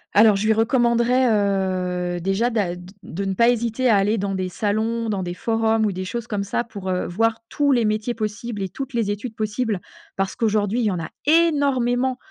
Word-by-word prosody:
Alors, 215 0 +7
je 200 +2 -1
lui 220 - +5
recommanderais, 235 +2 +2 0.9
heu, - - -3
déjà, 195 +7 +1
d'a 205 -7 -1
d 180 - -11 0.2
de 195 +4 -5
ne 195 -1 -1
pas 235 +4 +4
hésiter 235 +1 +1
à 220 - +5
aller 205 +3 +2
dans 200 -1 -2
des 185 -1 -2
salons, 220 +4 -1
dans 205 -3 -1
des 175 -1 -4
forums 225 +1 +1
ou 210 - +1
des 185 0 -4
choses 235 +5 -4
comme 210 -4 -2
ça 200 +4 -1
pour, 200 -5 -7
heu, 180 -1 -1
voir 225 +5 0
tous 285 +2 +1
les 240 -4 +3
métiers 215 +3 -1
possibles 215 -1 -4
et 190 - -3
toutes 270 +2 -6
les 220 -3 +1
études 215 +3 -5
possibles. 215 -1 -1 0.4
Parce 195 0 -2
qu'aujourd'hui, 215 0 +1
il 240 - +1
y 210 - +2
en 180 - -2
a, 165 - -5 0.2
énormément. 270 -6 +2
220 Hz, 215 wpm, -22 LUFS, 200-240 Hz, 0.9 s, Alors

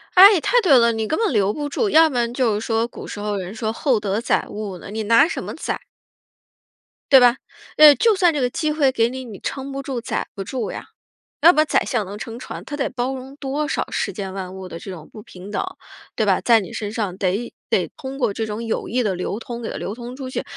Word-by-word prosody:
哎， 380 -1 +9
太 - - +3
对 305 -10 +6
了， 235 -1 +5
你 220 -1 -2
根 315 - 0
本 450 -1 +1
留 205 -3 +2
不 290 +2 -4
住， 410 +9 0
要 320 -2 +6
不 270 - -7
然 240 -1 0
就 245 -4 +1
是 210 - -1
说 225 0 +1
古 240 - -9
时 - - -7
候 205 -1 -2
人 185 +2 -6
说 220 0 -2
厚 245 +1 +1
德 205 0 -1
载 235 - 0
物 205 -3 -6
呢， 175 - -10
你 220 +1 -3
拿 230 +6 +5
什 335 - -4
么 - - -6
载？ - - -4 1.3
对 270 - +10
吧， 245 0 +5 0.4
呃， 305 -1 +9
就 450 +4 +3
算 355 -3 +3
这 295 - -1
个 250 -2 +1
机 305 +4 -1
会 300 -3 +3
给 235 -3 +1
你， 260 0 -6
你 215 -5 -9
撑 275 0 -5
不 275 - -4
住 260 -3 -3
载 230 - -3
不 195 - -6
住 255 +4 -3
呀。 - - -7 0.6
要 330 +3 +9
不 355 - -6
然 310 - +5
宰 - - +2
相 230 -6 -1
能 200 +2 -8
撑 225 +2 -7
船， - - -8
他 290 - -6
得 275 - -1
包 255 +1 -2
容 265 +2 -9
多 290 +1 -3
少 - - -1
世 - - -2
间 195 -3 -5
万 190 -1 -6
物 190 -1 -8
的 165 - -7
这 - - -9
种 165 -4 -10
不 215 - -10
平 190 0 -11
等， - - -1 0.5
对 220 - +1
吧？ 195 -3 +3
在 230 -3 +4
你 185 - -8
身 210 -1 -5
上 205 -5 -3
得 200 +5 -1 0.2
得 - - +1
通 270 0 -7
过 240 -7 0
这 225 +2 -2
种 215 +1 -5
有 225 - -2
益 250 +2 0
的 205 -4 0
流 180 +4 -3
通 235 0 -7
给 225 - -4
它 - - -6
流 - - -4
通 240 +2 -8
出 260 -1 -6
去， - - -3
235 Hz, 285 characters per minute, -21 LUFS, 210-275 Hz, 1.3 s, 对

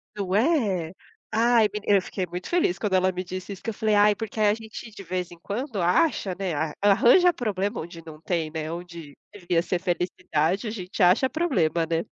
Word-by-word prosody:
Não 195 -2 -2
é? 210 - +1 0.4
Ai 230 0 +4
meni 210 -1 -5
eu 200 -1 +5
fiquei 185 0 -4
muito 180 +1 -6
feliz, 340 - +1
quando 210 -3 -2
ela 185 0 +3
me 185 0 -4
disse 185 +2 -7
isso, 195 - -9
que 225 - -2
eu - - -9
falei: 215 0 +1
“Ai, 210 +1 +5
porque 225 +1 -6
aí, 210 - +4
a 205 - +4
gente, 220 +1 -9
de 200 -2 -10
vez 180 0 -4
em 175 - -13
quando 215 - -4
acha, 185 - +2
né, 190 -3 -2
a 155 +1 -2
arranja 245 - +5
problema, 205 -5 -2
onde 165 0 -10
não 155 -1 -11
tem, 165 -4 -2
né, 160 0 -4
onde 170 -4 -9 0.2
devia 175 -4 -1
ser 180 0 -1
felicidade, 175 +1 -1
a 215 - -3
gente 190 -1 -5
acha 180 +8 +5
problema, 180 - 0
né?”. 165 0 0
185 Hz, 210 wpm, -25 LUFS, 175-215 Hz, 0.4 s, eu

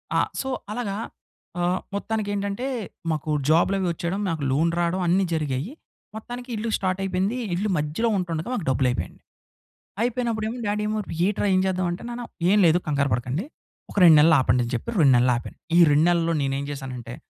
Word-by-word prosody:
ఆ! - - +4 0.2
సో, 265 - -4 0.2
అలాగా 210 -3 -3 0.6
ఆహ్, 180 +2 +1 0.2
మొత్తానికెంటంటే, 205 +1 -2 0.5
మాకు 155 0 -3 0.2
జాబ్‌లు 170 +5 +4
అవి 185 - 0
వచ్చేయడం, 170 +3 -3
మాకు 160 -4 -2
లోన్ 160 +5 +2
రావడం, 175 +2 0
అన్నీ 185 +3 +3
జరిగాయి. 150 - -2 0.4
మొత్తానికి 245 +3 -7
ఇల్లు 220 +2 -3
స్టార్ట్ 185 0 -1
అయిపోయింది. 195 +5 -1 0.2
ఇల్లు 205 +4 -1
మధ్యలో 150 +10 0
ఉంటుండగా, 170 0 -3
మాకు 200 -9 -3
డబ్బులు 130 0 +2
అయిపోయా‌యండి. 125 - -4 0.8
అయిపోయినప్పుడు 235 -2 -1
ఏమో 240 - -5
డ్యాడీ 210 +1 -1
ఏమో, 215 0 -1 0.3
"ఏంట్రా 205 0 0
ఏం - - +4
చేద్దాం" 185 -1 0
అంటే, 175 - -6
నాన్న 240 0 -5 0.2
ఏం 205 - +5
లేదు 165 +1 +4
కంగారు 140 -2 +1
పడకండి. 125 - -2 0.5
ఒక - - -12
2 165 -3 +9
నెలలు 160 +1 +6
ఆపండి 125 -1 +2
అని 120 - -6
చెప్పి. 120 - -4
2 135 -3 +6
నెలలు 125 +1 +3
ఆపాను. 120 - -9 0.2
ఈ - - +7
2 150 +3 +4
నెలల్లో 170 -1 +1
నేను 135 -1 0
ఏం 140 - -4
జేసానంటే, 125 -4 -7
175 Hz, 180 wpm, -24 LUFS, 150-205 Hz, 0.8 s, 2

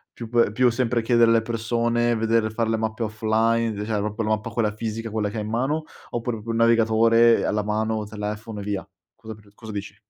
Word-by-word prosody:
più 115 -2 -8
pe 120 -2 +3
più 125 +1 +3
sempre 120 -1 0
chiedere 115 -1 +4
alle 115 -1 +4
persone, 120 +1 0
vedere 115 0 +1
far 110 +1 -1
le 110 - +1
mappe 110 +1 -3
offline, 110 +1 +1
d 105 0 -5
cioè 105 -1 -1
proprio 105 +2 -2
la 110 - -2
mappa 110 0 -1
quella 110 -3 0
fisica 115 +1 -4
quella 105 -1 -1
che 110 - -6
hai 105 - -2
in 105 - -5
mano, 135 +7 -1 0.3
oppure 115 -2 -3
proprio 115 - -6
il 115 - -1
navigatore, 115 0 +4
ehm, - - -1
alla 105 0 0
mano, 110 +1 -1
telefono 105 0 -6
e - - -5
via. 100 -1 -4 0.3
Cosa 110 -1 -9
pr 105 -1 -19
cosa 110 -1 -10
dici? 100 -1 -6
110 Hz, 225 wpm, -24 LUFS, 110-115 Hz, 0.3 s, chiedere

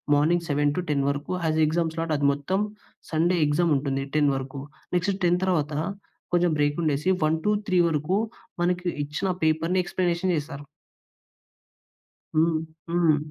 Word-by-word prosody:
Morning 170 +4 +2
7-10 145 0 +1
వరకు 145 +4 -3 0.2
ఆది 155 0 +1
exam 165 +1 0
slot 165 -1 -1
అది 140 0 +2
మొత్తం 165 +8 -1 0.5
సండే 170 +3 +2
ఎగ్జామ్ 155 +3 +2
ఉంటుంది 135 -1 -2
10 145 -1 +4
వరకు. 135 +1 -5 0.3
నెక్స్ట్ 185 +3 +1
10 175 +1 +3
తర్వాత 155 -5 0 0.6
కొంచెం 175 -1 +3
బ్రేక్ 145 +1 +2
ఉండేసి, 150 +3 +1 0.2
1-3 185 +4 +1
వరకు 155 +4 0 0.5
మనకి 180 +1 0 0.2
ఇచ్చిన 150 +7 -3 0.2
పేపర్‍ని 165 +4 +2
ఎక్స్‌ప్లేనేషన్ 180 0 0
చేస్తారు. 145 -2 -5 1.7
హ్మ్. 160 0 +3 0.3
హ్మ్. 170 -3 +3
160 Hz, 125 wpm, -25 LUFS, 145-175 Hz, 1.7 s, 10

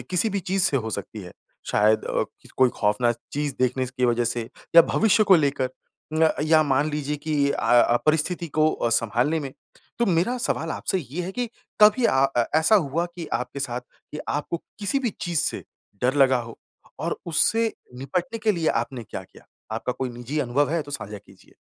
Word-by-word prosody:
किसी 185 +5 +2
भी 200 - -1
चीज़ 190 0 0
से 140 - +3
हो 110 -3 -2
सकती 100 +1 -5
है। 90 - -10 0.4
शायद 110 +1 +3
अ, - - 0 0.2
किस - - -18
कोई 130 -1 +4
खौफ़नाक 115 +3 +2 0.2
चीज़ 145 -1 -2
देख 125 0 +2
ने 130 - +1
स - - -9
की 130 -1 -1
वजह 120 0 +1
से 115 0 -2 0.3
या 170 - +12
भविष्य 215 +2 +3
को 195 -3 +7
लेकर 140 -4 0 0.4
उम 160 +1 +3
अ, - - +2
या 155 0 +4
मान 145 +1 +1
लीजिए 150 0 -2
कि 145 -2 +2
अ - - -1 0.2
अ, 120 0 +5
परिस्थिति 160 +3 +1
को 155 +1 +2
अ, 120 - -1
सँभालने 120 +7 +1
में। 135 -3 -6 0.5
तो 235 - +2
मेरा 185 +7 +1
सवाल 165 -8 -2
आपसे 190 - -1
ये 160 +2 -5
है 180 - -4
कि 245 +4 -2 0.3
कभी 215 +4 +6
अ, 135 -9 +4
ए 120 - +4
ऐसा 160 +7 +4
हुआ 165 -3 +2
कि 170 -3 -6
आपके 125 +3 -3
साथ, 125 -3 -2
कि 140 +4 -13
आपको 145 +4 -2 0.2
किसी 205 +6 0
भी 250 -5 -1
चीज़ 170 -2 -1
से - - -2 0.4
डर 125 +2 +2
लगा 135 -2 +4
हो 115 -1 -10 0.4
और - - -2
उससे 225 +7 +2 0.2
निपटने 175 - -3
के 215 -1 +2
लिए 165 -4 0
आपने 120 0 -2
क्या 95 - -7
किया? - - -19 0.3
आपका 115 +3 -2
कोई 130 +1 -3
निजी 120 +5 -5
अनुभव 140 +3 +1
है 165 0 +1
तो 145 - -12
साझा 105 -7 -5
कीजिए। 95 -1 -21
145 Hz, 210 wpm, -24 LUFS, 120-170 Hz, 0.5 s, या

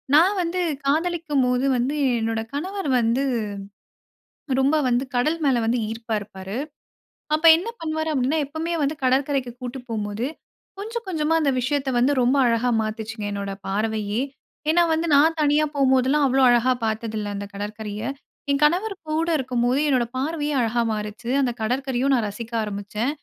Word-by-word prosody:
நான் 365 +7 +5
வந்து 355 +1 -1 0.2
காதலிக்கும்போது 290 -5 +1
வந்து, 265 +5 -1 0.2
என்னோட 225 0 -1
கணவர் 370 +3 -3
வந்து, 235 +4 +1 1.4
ரொம்ப 280 +4 +3
வந்து, 245 +1 +2
கடல் 305 +7 +1
மேல 255 -3 +3
வந்து 235 +2 +1
ஈர்ப்பா 225 0 -3
இருப்பாரு. 195 +1 -7 0.8
அப்ப 315 - -9
என்ன 355 +7 -4
பண்ணுவாரு 315 0 -2
அப்பிடின்னா, 275 +4 +1
எப்பவுமே 320 +3 -3
வந்து 285 +2 0
கடற்கரைக்கு 265 -1 +1
கூட்டு 250 +1 -5
போம்போது, 210 +1 -2 0.5
கொஞ்சம், 460 +3 -5
கொஞ்சமா 320 -2 0
அந்த 290 -3 +2
விஷயத்த 270 +1 -1
வந்து 260 +4 +3
ரொம்ப 255 +3 +3
அழகா 235 +1 +2
மாத்துச்சுங்க, 220 0 -5
என்னோட 200 -1 -4 0.2
பார்வையே! 215 +2 -1 0.5
ஏன்னா 345 +2 +5
வந்து 325 +1 -1
நான் 320 +3 +4
தனியா 295 +1 +3
போம்போதெல்லாம், 265 +1 +3
அவ்ளோ 265 +1 +3
அழகா 245 +1 +4
பார்த்ததில்ல, 220 -1 -3
அந்த 200 0 -5
கடற்கரைய. 210 +1 -5 0.5
என் 280 +1 0
கணவர் 370 +7 +2 0.2
கூட 320 +2 0
இருக்கும்போது, 250 0 0
என்னோட 255 -4 +2
பார்வையே 295 +1 -1
அழகா 235 +1 +1
மாறுச்சு. 210 +2 -5
அந்த 250 -2 +1
கடற்கரையும் 265 +3 0
நான் 230 -3 0
ரசிக்க 225 +3 -8
ஆரம்பிச்சேன் 210 +5 -3
255 Hz, 145 wpm, -23 LUFS, 225-300 Hz, 1.4 s, நான்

